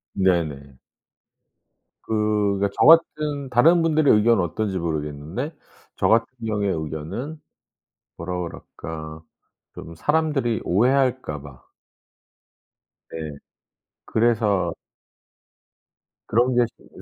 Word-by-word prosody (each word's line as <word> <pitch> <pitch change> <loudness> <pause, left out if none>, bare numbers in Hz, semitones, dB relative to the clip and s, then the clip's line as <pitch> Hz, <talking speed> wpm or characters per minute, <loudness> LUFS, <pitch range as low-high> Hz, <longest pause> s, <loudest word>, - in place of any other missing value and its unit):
네네. 80 -8 0 1.3
그 105 -2 0
그러니까 100 0 +1
저 - - +5
같은 150 -4 +4
다른 160 +8 +5
분들의 155 -3 +4
의견은 105 -2 +4
어떤지 95 +3 -2
모르겠는데 80 - -4 0.4
저 - - +1
같은 115 +1 +4 0.2
경우의 105 -3 0
의견은 80 - -5 0.8
뭐라 90 +2 -4
그럴까 80 -2 -8 0.5
좀 85 - -9
사람들이 145 - 0
오해할까 125 - +1
봐. 65 -3 -13 1.5
네. 80 -3 -6 0.7
그래서 105 -6 +1 1.5
그런 120 +3 +2
게 120 0 +4
신 - - -21
105 Hz, 205 characters per minute, -23 LUFS, 80-125 Hz, 1.5 s, 저